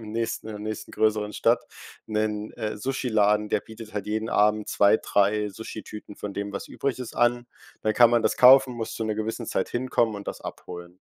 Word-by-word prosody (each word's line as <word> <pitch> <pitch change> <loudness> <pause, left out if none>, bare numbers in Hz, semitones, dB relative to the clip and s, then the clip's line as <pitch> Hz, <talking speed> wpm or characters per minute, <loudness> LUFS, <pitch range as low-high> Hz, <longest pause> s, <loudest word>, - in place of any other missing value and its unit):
im 110 -1 -9
nächsten 115 -1 -3
in - - -5
der 105 - -7
nächsten 110 0 -5
größeren 105 -1 +1
Stadt - - +2 0.5
'nen, 105 -1 -2
äh, 105 -1 -4
Sushi 130 +3 -3
Laden, 105 -1 +2
der - - +1
bietet 110 -1 -12
halt 105 -1 -3
jeden 110 +1 -2
Abend 105 0 +2
2, 100 +2 +4
3 105 +1 +1
Sushi-Tüten 105 0 -9
von 100 -1 -6
dem, 100 0 -4
was 100 - -6
übrig 135 -3 -3
ist, 125 -3 -7
an. 120 0 +2 0.4
Da 110 - +1
kann 120 +1 +6
man 120 -1 +3
das - - +1
kaufen, 130 0 +7
muss 115 -1 -5
zu 110 - -3
'ner 110 -1 -1
gewissen 110 +1 -4
Zeit 95 - -1
hinkommen 120 -3 0
und 100 0 -7
das - - -6
abholen. 90 +1 -9
110 Hz, 210 wpm, -25 LUFS, 105-115 Hz, 0.5 s, kaufen